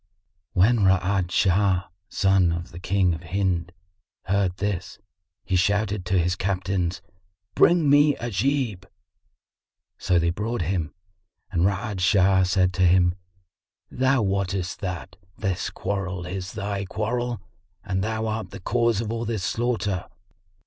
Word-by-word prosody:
When 110 +6 +4
Ra'ad 95 -1 +2
Shah, 95 0 +2 0.3
son 95 -3 +3
of 85 +1 -4
the 85 - -9
King 95 -1 +1
of 80 - -6
Hind, 90 -1 -1 0.5
heard 95 -1 0
this, 100 -1 -3 0.5
he 95 - -1
shouted 100 +1 +1
to 95 +1 +2
his 90 0 +1
captains, 95 -2 -2 0.5
"Bring 170 -3 +4
me 145 +1 +5
Ajib." 115 -3 -1 1.1
So 90 -2 +2
they 85 0 +2
brought 105 +2 -2
him 85 -2 -2 0.6
and 85 +1 +2
Ra'ad 100 0 -2
Shah 95 0 +4
said 90 0 +2
to 95 - -2
him, 90 0 +4 0.8
"Thou 130 -1 +2
wottest 95 -2 -1
that 90 -2 -5 0.2
this 95 -4 -2
quarrel 95 -2 -3
is 95 +1 -5
thy 100 -2 -3
quarrel 120 +4 -2 0.4
and 95 -2 -1
thou 110 +1 -2
art 110 0 -3
the 100 - -9
cause 115 +2 +1
of 110 -1 -4
all 115 0 -3
this 110 -4 -2
slaughter. 110 -6 -1
95 Hz, 135 wpm, -24 LUFS, 90-110 Hz, 1.1 s, me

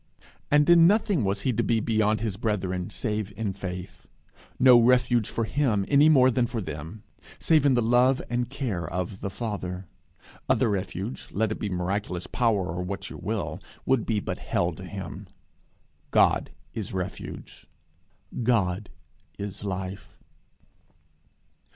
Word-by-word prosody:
And 150 0 +4
in 170 -1 +7
nothing 200 - +2
was 100 +1 0
he 130 - +1
to - - +1
be 115 - +1
beyond 110 -1 +1
his 110 -4 -2
brethren, 95 -5 -2
save 105 -3 -3
in 105 -4 -2
faith. 90 -2 -7 0.5
No 125 -2 +7
refuge 120 -2 +3
for 115 - -1
him, 110 -4 +1
any 145 +2 +5
more 130 -4 +6
than 125 -1 +1
for 115 - -3
them, 85 +3 -7 0.3
save 155 -3 +3
in 135 - +4
the 120 - +2
love 125 +3 +4
and 120 0 -1
care 115 - -3
of 90 +2 -4
the 100 - -2
Father. 95 -3 -4 0.6
Other 110 - +3
refuge, 100 +4 -4
let 110 +1 0
it - - -4
be 105 - -2
miraculous 90 0 -2
power 110 -6 +1
or 90 - -2
what 95 +2 -5
you - - -8
will, - - -3 0.2
would 130 -4 +1
be 110 -2 +1
but - - -4
hell - - 0
to - - -9
him. - - -7 0.8
God - - +3 0.2
is 110 -4 -5
refuge. 90 -1 -6 0.7
God 105 -5 +1 0.5
is 100 0 -6
life. 95 -1 -5
110 Hz, 150 wpm, -26 LUFS, 95-125 Hz, 0.8 s, in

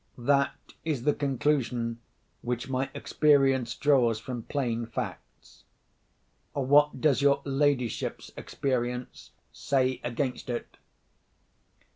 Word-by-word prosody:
That 140 +3 0
is 150 -7 -2
the 150 - +3
conclusion 130 -4 0 0.4
which 120 0 -3
my 135 0 -1
experience 135 -5 +2
draws 130 -6 +3
from 120 +1 -5
plain 120 -3 -2
facts. 115 - -7 0.9
What 145 +1 +3
does 140 -1 +3
your 140 0 +3
ladyship's 135 -4 0
experience 125 -2 -3 0.2
say 130 -2 0
against 125 +1 -3
it?" 120 - -5
130 Hz, 95 wpm, -28 LUFS, 120-140 Hz, 0.9 s, the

